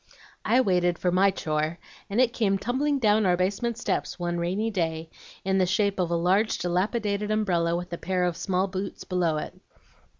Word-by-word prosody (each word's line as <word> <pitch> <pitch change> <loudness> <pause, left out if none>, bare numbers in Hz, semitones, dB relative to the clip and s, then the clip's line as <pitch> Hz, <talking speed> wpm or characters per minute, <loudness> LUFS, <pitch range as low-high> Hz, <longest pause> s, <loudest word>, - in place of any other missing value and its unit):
"I 255 - +4
waited 180 -5 +2
for 180 - 0
MY 190 +2 +4
chore, 155 -3 -2 0.3
and 200 +4 -1
it 250 -2 +3
came 200 -5 +1
tumbling 270 +8 0
down 215 -3 +3
our 180 -1 +3
basement 205 +6 -1
steps 245 - -2
one 175 -1 -2
rainy 195 +6 -1
day 160 -4 -2 0.3
in 190 0 +2
the 185 - +3
shape 200 0 +1
of 175 -2 +1
a 170 - 0
large 190 +6 +2
dilapidated 200 +3 -1
umbrella 175 -6 +1
with 175 0 -5
a 170 - -4
pair 185 0 -1
of 175 -2 0
small 185 +1 0
boots 195 0 -5
below 175 -4 0
it. - - -5
185 Hz, 190 wpm, -26 LUFS, 175-210 Hz, 0.3 s, I